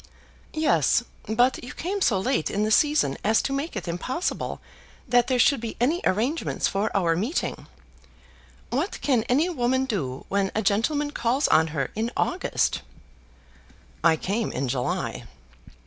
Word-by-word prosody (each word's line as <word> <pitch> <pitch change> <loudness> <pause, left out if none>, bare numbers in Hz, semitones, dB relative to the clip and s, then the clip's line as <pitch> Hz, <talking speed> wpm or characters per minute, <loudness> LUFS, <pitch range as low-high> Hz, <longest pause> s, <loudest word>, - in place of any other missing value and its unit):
"Yes; 235 - +3 0.2
but 245 +5 +2
you 245 - -7
came 390 +4 -3
so 215 - +3
late 240 - 0
in 205 - 0
the 215 - 0
season 295 - +3
as 220 +2 +3
to 275 - -2
make 280 +2 -3
it 195 - -5
impossible 255 - -3 0.5
that 245 0 +3
there 255 -1 +1
should 260 +1 +4
be 230 -1 -5
any 305 +10 +1
arrangements 240 - 0
for 200 +3 0
our 170 -4 +2
meeting. 225 - -2 1.0
What 290 +11 -1
can 255 -5 +2
any 285 +8 +3
woman 260 -5 +1
do 140 - -3
when 195 -1 0
a 220 - 0
gentleman 285 +9 +1
calls 255 +2 +1
on 160 +1 +5
her 150 -4 -3
in 225 +2 -1
August?" 365 +2 0 1.2
"I 165 -1 +5
came 205 +7 -2
in 135 +1 -2
July." 125 0 -2
235 Hz, 150 wpm, -25 LUFS, 195-275 Hz, 1.2 s, on